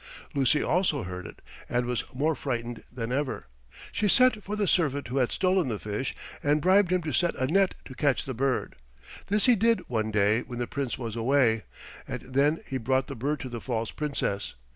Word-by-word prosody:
Lucy 140 +2 +3
also 160 - +1
heard 90 -1 -6
it - - -13 0.3
and 120 0 +1
was 125 -1 -1
more 150 +5 +1
frightened 120 -5 -4
than 120 -1 -4
ever. 130 - -2 0.5
She 210 - 0
sent 250 -1 +4
for 205 - -3
the 210 -1 +1
servant 145 -8 +1
who 130 - -2
had 125 -3 +2
stolen 185 -4 +2
the 110 -4 -2
fish 105 +6 -3 0.3
and 145 +1 +3
bribed 185 +2 +4
him 180 -1 +2
to 155 - -3
set 175 -1 +2
a 130 - 0
net 195 +7 +2
to 130 - -9
catch 140 -1 +1
the 130 - -4
bird. 130 +2 -1 0.5
This 205 +1 +2
he 250 -2 +6
did 230 +2 +2
one 110 -3 -1
day 105 +2 +3
when 120 - -8
the 120 - -1
Prince 135 0 -3
was 115 -4 -5
away, 115 - +2 0.4
and - - -4
then 140 +5 +1
he 130 - -3
brought 130 +2 +1
the 140 - -7
bird 145 +6 -2
to 130 - -5
the 120 -2 -6
false 115 -3 -2
Princess. 140 -9 -2
135 Hz, 205 wpm, -28 LUFS, 120-160 Hz, 0.5 s, he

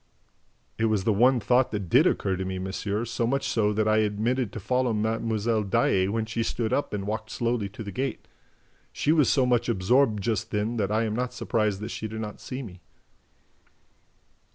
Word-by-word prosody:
"It 115 - +2
was 110 -3 +1
the 110 - +2
one 125 +5 +4
thought 125 +3 +3
that 100 -3 -4
did - - +5
occur 95 - 0
to 95 - -3
me, 95 0 -4
monsieur, 100 +4 -3
so 115 0 -1
much 135 +3 0
so 105 -2 +1
that 105 +1 0
I 110 0 +4
omitted 110 +3 -1
to 110 - -6
follow 125 +3 0
Mlle. 110 0 0
Daae, 95 -1 +2
when 110 +2 -1
she 115 +1 -3
stood 115 0 -1
up 145 - 0
and 100 -2 -3
walked 110 +1 -4
slowly 115 -4 -1
to 105 +3 -8
the 100 - -6
gate. 135 +7 -4 0.6
She 150 - 0
was 155 -4 +4
so 130 -3 +3
much 120 -1 +1
absorbed 110 +1 +2
just 110 -3 -1
then 105 +3 -1
that 105 -2 0
I 110 +1 +2
am 110 -1 -2
not 125 +1 -2
surprised 105 -3 0
that 110 - -4
she 110 - -4
did 110 +1 -6
not 105 -2 -6
see 130 +1 -5
me." 90 -6 -11
110 Hz, 200 wpm, -26 LUFS, 105-120 Hz, 0.6 s, did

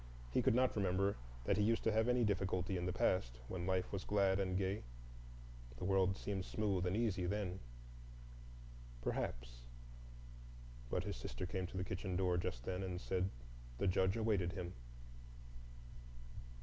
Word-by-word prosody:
He - - +3
could - - +4
not 130 0 +3
remember 100 0 +2 0.3
that 95 - +2
he 105 - +3
used 115 +2 +2
to 110 - +3
have 110 +1 +3
any 125 0 +4
difficulty 95 -2 +1
in 90 0 -1
the - - +1
past, 75 -9 +1
when 90 -1 -3
life 95 -1 +1
was 95 -2 -2
glad 100 -1 +3
and 95 -1 +1
gay. 95 +1 0 1.0
The 90 - -4
world 95 0 +3
seemed 100 -2 -2
smooth 100 -4 0
and 95 +4 +1
easy 100 -6 +1
then. 95 -1 -1 1.4
Perhaps,—but - - -6
his - - -3
sister 90 - -4
came 95 0 -2
to 95 - -7
the 90 - 0
kitchen 95 0 -3
door 90 -1 +2
just - - -2
then 90 +6 -2
and 90 -2 -3
said 95 0 0 0.5
the - - 0
Judge 95 +1 +3
awaited 100 -6 +1
him. 90 -2 -4
95 Hz, 155 wpm, -39 LUFS, 90-100 Hz, 1.4 s, could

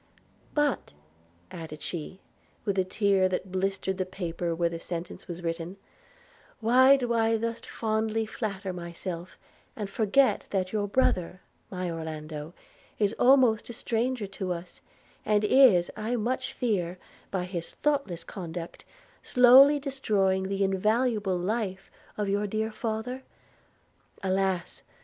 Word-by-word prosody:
'But,' 295 - 0 0.6
added 155 -3 -8
she, 175 +2 -6 0.4
while 200 -3 0
a - - +4
tear 190 0 +2
had 185 - 0
blistered 190 0 -2
the 185 - +1
paper 175 -2 -3
where 170 0 +1
the 170 0 -5
sentence 170 +1 -6
was 175 0 -7
written, 165 +2 -4 0.8
'why 260 +4 +6
do 245 -3 -1
I 225 0 +3
thus 230 +1 -3
fondly 220 0 -1
flatter 200 -4 -4
myself, 170 0 -6 0.4
and 210 - -4
forget 220 +6 +2
that 185 -2 -1
your 205 -1 0
brother, 185 -6 +1 0.3
my 185 -1 -3
Orlando, 155 -1 -6 0.4
is 205 0 +1
almost 250 -4 +5
a - - -5
stranger 235 0 -1
to 195 -1 -4
us, 175 +1 -9 0.4
and 210 0 +2
is, 210 -6 +6
I 220 +3 -2
much 240 +3 -2
fear, 185 -7 -1 0.3
by 190 -2 -1
his 180 -2 -5
thoughtless 280 - -1
conduct, 170 -3 -7 0.4
slowly 265 +3 +7
destroying 205 -9 0
the 195 0 0
invaluable 210 0 +1
life 190 0 -3 0.3
of 210 -1 -1
your 205 +1 0
dear 220 +2 -2
father? 225 +3 -3 1.0
Alas! 190 -2 -1
195 Hz, 130 wpm, -28 LUFS, 180-225 Hz, 1.0 s, slowly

